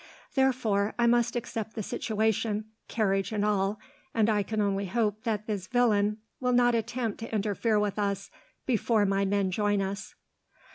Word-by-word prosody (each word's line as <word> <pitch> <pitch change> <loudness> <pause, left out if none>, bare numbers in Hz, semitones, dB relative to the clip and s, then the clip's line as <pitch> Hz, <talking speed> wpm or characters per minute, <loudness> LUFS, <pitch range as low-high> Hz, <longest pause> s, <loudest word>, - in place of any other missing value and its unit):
Therefore, 240 -7 +1
I 235 - +3
must 240 0 +3
accept 225 -2 -4
the 220 - -3
situation, 220 -1 0 0.2
carriage 195 -3 0
and 210 -1 0
all, 205 0 +1 0.4
and 220 -1 +3
I 210 -1 +2
can 215 +2 -3
only 200 -1 0
hope 215 +1 0
that 215 -2 -1
this 200 -4 -3
villain 215 -4 +2 0.2
will 250 -1 +1
not 245 0 +4
attempt 230 -1 -2
to 225 - -6
interfere 215 +1 +1
with 210 0 -1
us 200 -1 -2 0.3
before 225 -3 +2
my 195 0 +1
men 195 -1 +1
join 205 +1 +1
us. 195 +1 -4
210 Hz, 160 wpm, -28 LUFS, 200-230 Hz, 0.4 s, not